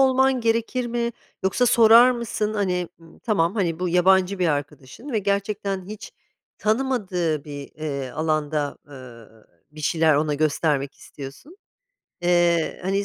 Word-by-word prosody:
olman 265 -1 +3
gerekir 230 +2 0
mi, 235 0 -1 0.3
yoksa 190 +6 +2
sorar 235 +1 +7
mısın, 220 -3 -2
hani, 180 -4 -1
hımm, 165 -1 -18
tamam, 195 -4 0
hani, 175 -6 -1
bu 180 - 0
yabancı 185 +2 +3
bir 175 -2 +2
arkadaşın 145 - -5
ve 220 - +1
gerçekten 200 -1 -2
hiç 215 -1 -9 0.5
tanımadığı 200 - -1
bir, 145 -2 -8
eee, 140 -4 -4
alanda, 155 -1 -1
ııı, 115 -5 -14 0.2
bir 155 - -12
şeyler 160 0 +2
ona 150 0 +1
göstermek 145 -2 0
istiyorsun. 145 - -11 0.7
Eee, 175 -1 +2
hani, 195 +2 0
180 Hz, 135 wpm, -23 LUFS, 150-220 Hz, 0.7 s, sorar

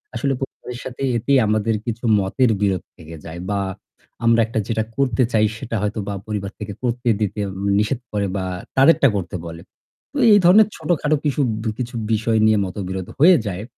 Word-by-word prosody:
আসলে 140 -1 0
প - - -24 0.4
সাথে 130 +1 -6
এতেই 135 +5 +2
আমাদের 110 +1 +1
কিছু 115 0 -4 0.2
মতের 115 +6 +1
বিরোধ 95 -3 +1
থেকে 80 0 -11
যায়। 80 +1 -7
বা 100 -1 0 0.7
আমরা 115 0 +4
একটা 115 0 -2
যেটা 110 -1 0
করতে 130 -3 +2
চাই 110 -1 +4
সেটা 115 0 -5
হয়তো 105 +1 -2
বা 100 - -2
পরিবার 105 -2 -3
থেকে 105 -1 -5
করতে 120 0 -1
দিতে 105 0 -2 0.4
নিষেধ 110 +4 0
করে 100 -1 -1
বা 95 - -2 0.3
তাদেরটা 140 +1 +6
করতে 90 -2 -3
বলে। 85 0 -8 0.5
তো - - -5 0.2
এই 205 - +7
ধরনের 200 +4 +7
ছোটখাটো 155 -1 0
কিশু 145 -1 0 0.4
কিছু 125 0 -4 0.2
বিষয় 110 +1 +1
নিয়ে 110 0 +4
মতবিরোধ 95 -1 -5
হয়ে 175 +4 +7
যায়। 100 +1 -4
110 Hz, 175 wpm, -21 LUFS, 100-130 Hz, 0.7 s, এই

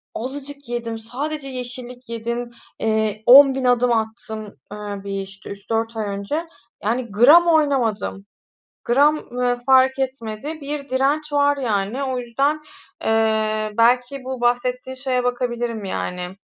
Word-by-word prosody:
azıcık 280 +2 -7
yedim, 230 -2 -3
sadece 275 +6 -5
yeşillik 250 -1 -7
yedim, 235 +1 -3 0.3
eee, 220 -1 0
10.000 270 0 +8
adım 245 0 +3
attım, 220 -1 -3 0.3
eee, 205 -1 -6
bir, 195 -1 -3
işte, 195 +1 -10
3-4 225 +3 -3
ay 215 - -1
önce, 295 +12 -3 0.4
yani, 235 +1 -1
gram 290 +11 +7
oynamadım. 260 -11 +1 0.6
Gram, 285 +5 +4 0.2
ııı, 245 0 +1
fark 265 0 +5
etmedi, 265 +3 -4
bir 285 0 -5
direnç 285 +4 0
var, 285 0 +3
yani. 230 +1 -1
O 260 -1 -2
yüzden, 275 +6 0 0.4
eee, 220 -1 +1
belki 250 +3 +2
bu 260 -1 -5
bahsettiğin 250 +1 0
şeye 255 -1 -1
bakabilirim, 240 -3 -2
yani. 180 -1 -4
245 Hz, 125 wpm, -21 LUFS, 220-270 Hz, 0.6 s, 10.000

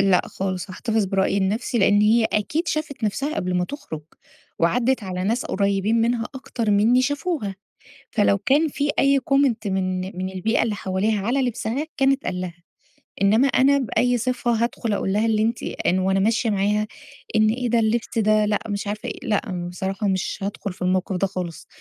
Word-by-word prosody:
لأ 195 -2 +4
خالص، 185 0 -4
هاحتفظ 220 +2 0
برأيي 195 +1 +1
لنَفسي 220 +5 0
لأن 205 +1 +4
هي 220 +2 +4
أكيد 300 - -1
شافِت 300 -6 -3
نَفسها 275 +10 -1
قبل 180 - -2
ما 180 0 +1
تُخرج 160 - -7 0.6
وعدِّت 240 +8 +2
على 185 0 -3
ناس 230 +5 0
قريّبين 200 +3 +1
منها 230 0 +1
أكتر 235 -4 -3
منّي 225 +5 +4
شافوها، 285 - -2 0.6
فلو 205 -2 +3
كان 290 +9 +2
في 285 +1 -1
أي 275 0 +4
comment 275 -4 +1
من 185 -1 -1 0.2
من 185 0 -2
البيئة 190 +5 0
اللي 220 -2 0
حواليها 200 +2 -1
على 265 +3 +1
لبسها 245 +4 -2
كان 270 0 +4
اتقال 185 -10 -2
لها، 175 -1 -7 0.6
إنّما 220 +7 +4
أنا 275 +1 +4
بأي 245 0 +1
صفة 250 +1 -1
هادخل 235 -2 -1
أقول 195 -1 -1
لها 215 +2 +2
اللي 220 -1 +2
أنتِ 230 +2 0
إن 185 +1 0
وأنا 190 +1 +1
ماشية 225 +3 +2
معاها 210 +1 +1 0.5
إن 215 0 +4
إيه 245 +2 -1
ده 235 0 +3
اللبس 225 +1 0
ده 215 -1 +3
لأ 210 0 +1
مش 200 0 -3
عارفة 210 +1 -4
إيه، - - -7
لأ 185 -5 -1
بصراحة 195 +2 -3
مش 190 -1 -1
هادخل 200 -1 -4
في 180 - -21
الموقف 185 +1 0
ده 195 +2 +1
خالص، 180 -3 -6
215 Hz, 180 wpm, -23 LUFS, 195-245 Hz, 0.6 s, لأ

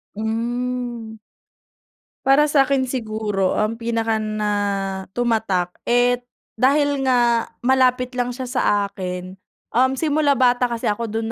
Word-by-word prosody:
Hmm. 235 +1 -3 1.1
Para 275 +2 +5
sa'kin 275 -2 +2
siguro 215 -6 -2
ang 225 +2 -1
pinaka 225 -1 0
na 215 -1 -2 0.7
tumatak 215 -7 0 0.2
eh, 245 +1 +3 0.3
dahil 285 +3 +2
nga 240 -3 +2 0.2
malapit 255 -1 +2
lang 245 -1 -1
siya 255 +1 -5
sa 250 +1 -1 0.2
akin, 185 -2 -6 0.4
um, 260 +2 +2
simula 295 -2 +2
bata 250 -1 +3
kasi 235 -1 -4
ako 220 +2 -1
dun 225 +1 -2
240 Hz, 115 wpm, -21 LUFS, 220-260 Hz, 1.1 s, Para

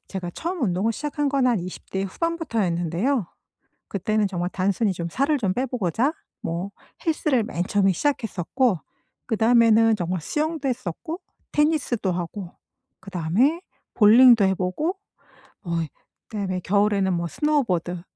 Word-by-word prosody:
제가 185 -3 -4
처음 345 +1 -4
운동을 195 +2 +1
시작한 295 +3 -2
건 270 -2 +2
한 240 -4 +3
20 180 +1 -8
대 190 - -1
후반부터였는데요. 215 - -1 0.6
그때는 210 +2 0
정말 180 -2 -2
단순히 195 +2 +1
좀 170 -2 -4
살을 280 - +1
좀 195 -7 0
빼 255 - 0
보고자 245 - 0 0.3
뭐 170 +4 -3 0.4
헬스를 305 -7 +1
맨 175 -4 -3
처음에 195 0 +2
시작했었고 225 - 0 0.5
그다음에는 225 -1 +4
정말 180 -1 -2
수영도 300 - -2
했었고 255 - -4 0.3
테니스도 295 -9 +1
하고 175 +1 -5 0.5
그다음에 195 - +1 0.3
볼링도 230 0 +7
해 190 0 +3
보고 190 - -2 0.7
어 175 - -7 0.6
그다음에 195 -4 -3
겨울에는 200 0 +2
뭐 170 0 -1
스노보드 180 - 0
210 Hz, 305 characters per minute, -24 LUFS, 185-265 Hz, 0.7 s, 볼링도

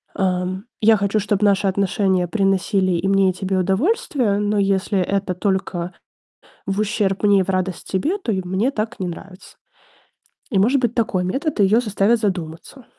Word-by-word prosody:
ам: 185 +1 -1 0.2
"Я 220 +1 +6
хочу, 200 +2 0
чтоб 205 0 -1
наши 200 -1 +3
отношения 190 -1 +1
приносили 195 -1 +1
и 170 +3 -1
мне, 195 -1 +3
и - - -9
тебе 190 +1 -2
удовольствие, 210 - 0
но 210 0 0
если 195 0 +1
это 195 0 -1
только 185 -2 -2 0.7
в 195 +1 -2
ущерб 210 -2 -1
мне 200 -2 +5
и - - +1
в 195 - -7
радость 185 -1 -2
тебе, 300 - 0
то 250 - -3
и 190 -2 -1
мне 195 +9 0
так 220 -2 -4
не 180 - -1
нравится". 185 +2 -10 0.9
И 195 - +1
может 250 +7 +3
быть 240 -2 0
такой 210 -6 0
метод 270 - -2
ее 205 +4 +4
заставит 215 +1 +1
задуматься. 185 +5 -4
195 Hz, 170 wpm, -20 LUFS, 185-215 Hz, 0.9 s, Я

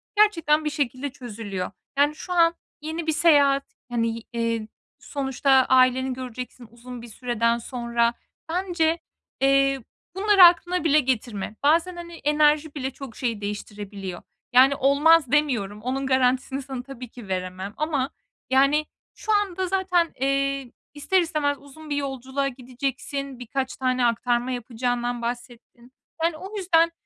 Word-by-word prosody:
gerçekten 330 -8 +3
bir - - +1
şekilde 280 -1 -2
çözülüyor. 215 -8 -6 0.3
Yani, 290 +2 +3
şu 360 +3 -6
an 335 -1 +4 0.3
yeni 320 +2 -4
bir 315 - +3
seyahat, 285 -4 +4 0.3
hani, 230 -1 -1
eee, 230 -2 -1 0.3
sonuçta 275 -1 -1 0.2
aileni 260 0 +4
göreceksin 250 -1 -7
uzun 240 +1 -10
bir 240 - -10
süreden 235 0 0
sonra. 235 -1 0 0.4
Bence, 340 -2 0 0.4
eee, 275 -1 +3 0.3
bunları 395 -1 +6
aklına 350 +1 +5
bile 305 -2 +5
getirme. 230 -6 -2
Bazen, 330 +5 +3
hani, 340 0 -8
enerji 300 -1 +2
bile 265 -2 -3
çok 265 -3 -10
şey 230 -5 -2
değiştirebiliyor. 205 -2 -6 0.3
Yani, 265 +3 +7
olmaz 285 +1 +4
demiyorum. 235 -9 +1
Onun 265 +3 -2
garantisini 260 +1 +1
sana 260 -2 -6
tabii 255 -1 -9
ki 235 -3 -12
veremem 185 +1 -4
ama, 290 -3 0 0.4
yani, 275 +3 +4 0.3
şu 435 - -3
anda 380 -3 0
zaten, 360 -3 +1
eee, 275 -1 0 0.2
ister 330 +6 +2
istemez 300 -4 0
uzun 300 +2 -13
bir 290 - -1
yolculuğa 275 0 -2
gideceksin. 265 +1 -5
Birkaç 260 +2 -3
tane 255 -1 +1
aktarma 240 +1 +1
yapacağından 245 0 -2
bahsettin. 240 0 -7 0.3
Yani, 330 -2 +1
o 390 +5 -7
yüzden, 335 -3 +3
270 Hz, 135 wpm, -24 LUFS, 240-305 Hz, 0.4 s, Yani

